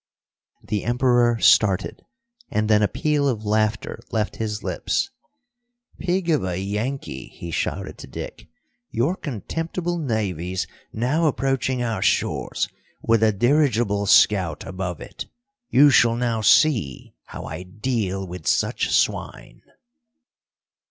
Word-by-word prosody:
The 105 Hz, -2 st, -2 dB
Emperor 120 Hz, -1 st, +3 dB
started, 100 Hz, -3 st, +3 dB, 0.5 s
and 105 Hz, 0 st, 0 dB
then 105 Hz, -1 st, +4 dB
a 105 Hz, -, +4 dB
peal 150 Hz, +2 st, 0 dB
of 110 Hz, -4 st, -3 dB
laughter 110 Hz, +1 st, 0 dB
left 110 Hz, -2 st, -1 dB
his 105 Hz, -2 st, -3 dB
lips. -, -, -1 dB, 0.9 s
"Pig 180 Hz, 0 st, -1 dB
of 150 Hz, -, +2 dB
a 90 Hz, -1 st, -2 dB
Yankee," 105 Hz, -, -4 dB
he 85 Hz, -, -9 dB
shouted -, -, -3 dB
to -, -, -9 dB
Dick, -, -, -8 dB, 0.4 s
"your 135 Hz, +11 st, 0 dB
contemptible 165 Hz, -, -4 dB
navy's 95 Hz, -, -2 dB, 0.3 s
now 145 Hz, +9 st, +1 dB
approaching 130 Hz, -1 st, 0 dB
our 115 Hz, -5 st, -2 dB
shores, -, -, 0 dB, 0.4 s
with 115 Hz, -1 st, +3 dB
a 110 Hz, -1 st, +5 dB
dirigible 115 Hz, -3 st, +2 dB
scout 95 Hz, -5 st, +4 dB
above 95 Hz, -3 st, -5 dB
it. -, -, -8 dB, 0.4 s
You 145 Hz, +2 st, +6 dB
shall 115 Hz, -2 st, +5 dB
now 120 Hz, -2 st, -1 dB
see 110 Hz, -, +3 dB
how -, -, -8 dB
I 80 Hz, +4 st, -6 dB
deal 95 Hz, 0 st, -2 dB
with 90 Hz, -3 st, -8 dB
such -, -, +1 dB
swine!" -, -, -1 dB
110 Hz, 125 wpm, -23 LUFS, 100-130 Hz, 0.9 s, You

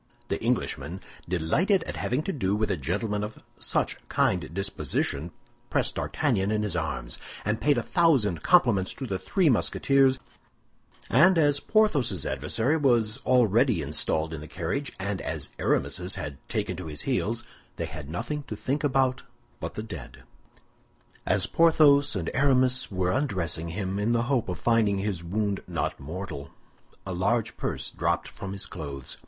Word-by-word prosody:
The -, -, -1 dB
Englishman, -, -, -1 dB, 0.3 s
delighted 160 Hz, -, +2 dB
at -, -, -6 dB
having 130 Hz, +5 st, -1 dB
to 195 Hz, -, -2 dB
do 100 Hz, -8 st, 0 dB
with 105 Hz, -1 st, 0 dB
a -, -, +2 dB
gentleman 100 Hz, -, -2 dB
of 105 Hz, +1 st, -7 dB, 0.2 s
such -, -, 0 dB
a -, -, -28 dB
kind 90 Hz, -2 st, +1 dB
disposition, 85 Hz, -4 st, -1 dB, 0.4 s
pressed -, -, +1 dB
D'Artagnan 95 Hz, +1 st, 0 dB
in 105 Hz, 0 st, +1 dB
his 105 Hz, -, -1 dB
arms, 65 Hz, -8 st, -2 dB, 0.3 s
and 105 Hz, +1 st, 0 dB
paid 145 Hz, -2 st, +3 dB
a 120 Hz, -, 0 dB
thousand 130 Hz, -, +3 dB
compliments 115 Hz, -, +3 dB
to 135 Hz, -, -5 dB
the 95 Hz, -6 st, -3 dB
three 175 Hz, -, +1 dB
Musketeers, 135 Hz, +1 st, +3 dB, 0.9 s
and 170 Hz, +8 st, +5 dB
as 145 Hz, -3 st, +3 dB
Porthos's 140 Hz, -, +2 dB
adversary 110 Hz, -, 0 dB
was 120 Hz, -6 st, +2 dB
already 120 Hz, -, +4 dB
installed 80 Hz, +1 st, +1 dB
in 75 Hz, -, -5 dB
the 75 Hz, -, -8 dB
carriage, 95 Hz, -, -3 dB
and 100 Hz, -1 st, -2 dB
as -, -, -4 dB
Aramis's 90 Hz, +2 st, 0 dB
had 70 Hz, -1 st, -6 dB
taken 90 Hz, -, -1 dB
to 90 Hz, -3 st, -6 dB
his 75 Hz, -1 st, -2 dB
heels, 120 Hz, -3 st, -1 dB, 0.3 s
they -, -, -3 dB
had 75 Hz, -1 st, -8 dB
nothing 150 Hz, -, -3 dB
to 110 Hz, -, -4 dB
think 135 Hz, +8 st, -2 dB
about 130 Hz, -2 st, +2 dB, 0.4 s
but -, -, -5 dB
the 110 Hz, -, -4 dB
dead. 70 Hz, -, -9 dB, 1.0 s
As -, -, +2 dB
Porthos 150 Hz, -5 st, +5 dB
and 85 Hz, -4 st, -2 dB
Aramis 130 Hz, -2 st, +3 dB
were 90 Hz, -1 st, 0 dB
undressing 90 Hz, -, -1 dB
him, 95 Hz, +2 st, -3 dB
in 110 Hz, +3 st, +1 dB
the 120 Hz, 0 st, +2 dB
hope 125 Hz, -5 st, 0 dB
of 90 Hz, -, -3 dB
finding 110 Hz, -1 st, +2 dB
his 95 Hz, -3 st, -2 dB
wound 100 Hz, +3 st, -1 dB
not -, -, -2 dB
mortal, 75 Hz, -2 st, -6 dB, 0.6 s
a 95 Hz, -, -4 dB
large 105 Hz, +6 st, 0 dB
purse -, -, -3 dB
dropped -, -, 0 dB
from 95 Hz, 0 st, -7 dB
his 100 Hz, 0 st, -3 dB
clothes. 70 Hz, -6 st, -6 dB
105 Hz, 160 wpm, -27 LUFS, 90-130 Hz, 1.0 s, and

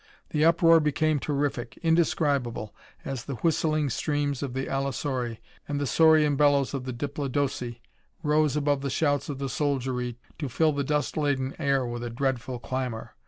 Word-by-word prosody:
The 150 Hz, -, +1 dB
uproar 165 Hz, 0 st, +6 dB
became 155 Hz, 0 st, +1 dB
terrific, 140 Hz, -4 st, -2 dB
indescribable, 145 Hz, -9 st, +1 dB, 0.3 s
as 135 Hz, -3 st, -4 dB
the 140 Hz, -, -4 dB
whistling 155 Hz, -1 st, +1 dB
screams 145 Hz, 0 st, -1 dB
of 135 Hz, -3 st, -4 dB
the 135 Hz, +1 st, -1 dB
allosauri 135 Hz, -3 st, -2 dB, 0.3 s
and 145 Hz, -1 st, -2 dB
the 145 Hz, -, 0 dB
saurean 155 Hz, 0 st, +5 dB
bellows 140 Hz, -1 st, +3 dB
of 135 Hz, -2 st, -3 dB
the 130 Hz, -, -3 dB
diplodoci 135 Hz, -2 st, -2 dB, 0.4 s
rose 150 Hz, -1 st, +2 dB
above 145 Hz, -2 st, +1 dB
the 140 Hz, -, -2 dB
shouts 145 Hz, 0 st, 0 dB
of 140 Hz, -, -3 dB
the 135 Hz, 0 st, -3 dB
soldiery 130 Hz, -3 st, -1 dB, 0.2 s
to 145 Hz, -4 st, -3 dB
fill 155 Hz, +5 st, +2 dB
the 140 Hz, 0 st, -1 dB
dust 150 Hz, +2 st, -1 dB
laden 140 Hz, -3 st, 0 dB
air 140 Hz, -4 st, +1 dB
with 120 Hz, 0 st, -4 dB
a 120 Hz, -, -3 dB
dreadful 130 Hz, 0 st, -2 dB
clamor. 125 Hz, -2 st, -4 dB
140 Hz, 165 wpm, -27 LUFS, 130-150 Hz, 0.4 s, uproar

